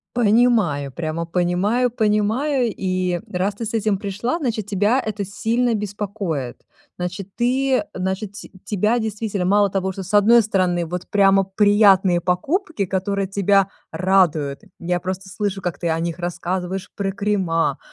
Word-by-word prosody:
Понимаю, 210 - +2
прямо 165 +2 -3
понимаю 180 +8 +1
понимаю. 225 +4 +1
И 185 -2 -1
раз 190 +3 -1
ты 225 +2 -5
с 220 - -5
этим 215 -2 +1
пришла, 205 - -2
значит, 230 - -2
тебя 205 +4 +1
это 210 -3 -4
сильно 230 +4 0
беспокоит. 200 - -3 0.4
Значит, 180 +2 -5
ты 260 +3 +1
значит 190 +2 -3
ть 205 - -10
тебя 210 +3 +1
действительно 215 -3 -3
мало 200 +2 +3
того, 190 0 -1
что 190 0 -6
с 195 - -9
одной 220 +3 +6
стороны, 185 -5 0
вот 180 +2 -6
прямо 195 -1 +4
приятные 195 -2 +4
покупки, 275 - -1
которые 195 +1 -1
тебя 195 0 +2 0.2
радуют. 175 -7 +1 0.2
Я 175 0 -1
просто 190 +1 -4
слышу, 195 0 -3
как 175 -6 -4
ты 170 - -1
о 160 - 0
них 170 0 -3
рассказываешь 180 +1 -3
про 195 -1 -2
крема, 185 -7 0
195 Hz, 145 wpm, -21 LUFS, 180-215 Hz, 0.4 s, одной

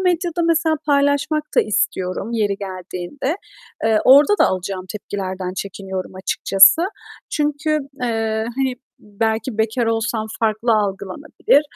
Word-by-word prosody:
medyada 350 -2 0
mesela 325 -1 +2
paylaşmak 285 +1 +2
da - - +8
istiyorum 195 0 -1
yeri 205 -4 0
geldiğinde. 190 - -5 0.5
Eee, 220 -1 +3
orada 295 +10 +6
da - - +5
alacağım 185 0 -3
tepkilerden 190 -3 -5
çekiniyorum 190 -1 -5
açıkçası. 195 - +5 0.5
Çünkü, 300 0 -1 0.3
eee, 225 -2 -1
hani, 265 -2 0 0.2
belki 220 +3 -2
bekar 230 +2 +1
olsam 225 -1 -1
farklı 225 +1 +1
algılanabilir 210 +8 +1
220 Hz, 110 wpm, -20 LUFS, 195-285 Hz, 0.5 s, da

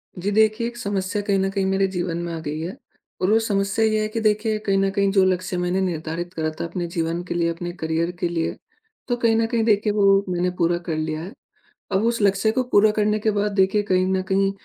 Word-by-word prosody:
जी, 190 +3 -2
देखिए 220 +2 +2
एक 240 0 -8
समस्या 200 -2 -2
कहीं 200 -1 +1
न 190 0 +1
कहीं 195 -1 -1
मेरे 195 0 +2
जीवन 175 -2 -3
में 170 - -4
आ 165 - -4
गई 155 0 -4
है 170 +4 -5 0.5
और 185 - +2
वो 220 - +5
समस्या 200 0 0
ये 215 0 +1
है 215 - 0
कि 215 +1 -3
देखिए 215 0 +1
कहीं 195 -1 +2
न 195 0 +2
कहीं 200 0 +1
जो 195 -1 +4
लक्ष्य 185 -1 -1
मैंने 180 +2 0
निर्धारित 175 0 -3
करा 160 -2 -1
था - - -2
अपने 175 0 -4
जीवन 165 0 -2
के 180 - -4
लिए, 170 -1 +1
अपने 175 +1 -4
करियर 165 0 -1
के 175 - 0
लिए, 165 -1 -2 0.5
तो 245 - +1
कहीं 230 -2 +2
न 225 0 +2
कहीं 230 0 0
देखिए 210 -1 +2
वो 195 -1 +4
मैंने 180 0 0
पूरा 170 0 +2
कर 160 - -1
लिया 155 0 -2
है। 185 +5 -8 0.6
अब 195 +2 +1
उस 230 -1 0
लक्ष्य 200 +2 +3
को 255 +3 0
पूरा 210 +1 +5
करने 210 0 +1
के 215 +1 +1
बाद 205 0 0
देखिए, 195 +2 +3
कहीं 185 -2 +2
न 190 - +1
कहीं 195 0 +3
195 Hz, 245 wpm, -22 LUFS, 175-210 Hz, 0.6 s, वो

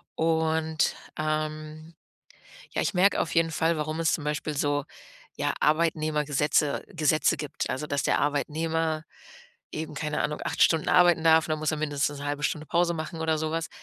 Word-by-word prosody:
und, 160 -1 +1 0.2
ähm, 155 +1 -3 0.8
ja, - - 0
ich - - 0
merke 185 +2 +4
auf 165 - -2
jeden 165 -1 +2
Fall, 165 +1 +1
warum 155 +1 -3
es 165 0 +2
zum 155 - -3
Beispiel 150 0 -2
so, 145 0 0 0.5
ja, - - -1
Arbeitnehmergesetze 150 -2 +1
Gesetze 155 0 +2
gibt. 150 -2 -4
Also, 130 +4 -3
dass 145 -3 -1
der - - +2
Arbeitnehmer 155 +2 -1 0.7
eben, 155 -1 -5
keine 150 +1 -2
Ahnung, 150 - -2
8 - - 0
Stunden 160 -2 +3
arbeiten 175 -2 +5
darf 160 0 +5
und 155 - -2
dann 155 - -1
muss 155 -1 0
er 155 - -2
mindestens 145 -1 -1
'ne 140 - -7
halbe 145 0 -3
Stunde 155 +1 -1
Pause 170 +1 +2
machen 160 +1 -5
oder 160 -1 +1
sowas. 160 +1 -2
155 Hz, 175 wpm, -27 LUFS, 150-160 Hz, 0.8 s, arbeiten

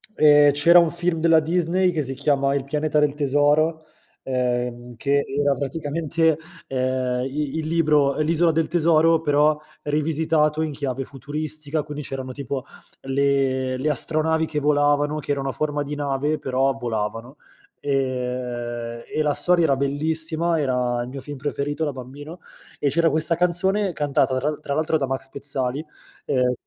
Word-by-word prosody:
Ehm, 145 -1 +6
c'era 170 +5 +6
un 170 -2 +3
film 175 -1 -1
della 165 0 +5
Disney 180 +3 +1
che 160 -3 -1
si 135 -1 -3
chiama 140 0 +1
"Il 140 - -1
pianeta 150 +1 0
del 150 -1 +2
tesoro", 150 +3 +2 0.4
ehm, 125 -1 -2
che 140 +1 +1
era 140 0 +1
praticamente, 155 +3 0 0.3
ehm, 130 -1 -1
i 145 +2 -3
il 155 - -3
libro 150 -3 +2
"L'Isola 165 +2 +3
del 160 0 0
Tesoro", 165 -1 +3
però 150 0 +3 0.3
rivisitato 155 +1 +1
in 155 - -2
chiave 135 -2 -3
futuristica, 150 +2 -3
quindi 150 -1 -7
c'erano 130 -1 -5
tipo 140 -1 -5 0.4
le 135 -1 0
le 150 +4 -1
astronavi 160 +3 +1
che 150 -1 -3
volavano, 145 +1 +2
che 145 - -4
erano 135 -1 -1
a - - -1
forma 150 0 -2
di 145 +1 -5
nave 145 +1 -1
però 135 +1 +1
volavano, 115 +3 -4 0.4
ehm, 125 -3 -3
e 155 - -2
la 150 -1 +1
storia 175 -1 +2
era 140 -4 +3
bellissima, 160 +4 0
era 125 -3 0
il - - -7
mio 135 0 -7
film 145 0 -8
preferito 145 +2 -3
da 145 - -1
bambino 145 +7 -9 0.4
e 145 - +1
c'era 165 +3 +3
questa 155 +2 0
canzone, 180 +3 +1
cantata 140 -3 +1
tra 145 +3 0
l 150 - -5
tra 140 -2 -4
l'altro 155 +1 +1
da 135 -3 -2
Max 135 0 -3
Pezzali, 140 0 -2 0.4
ehm 125 -1 +1
145 Hz, 160 wpm, -23 LUFS, 135-155 Hz, 0.4 s, Ehm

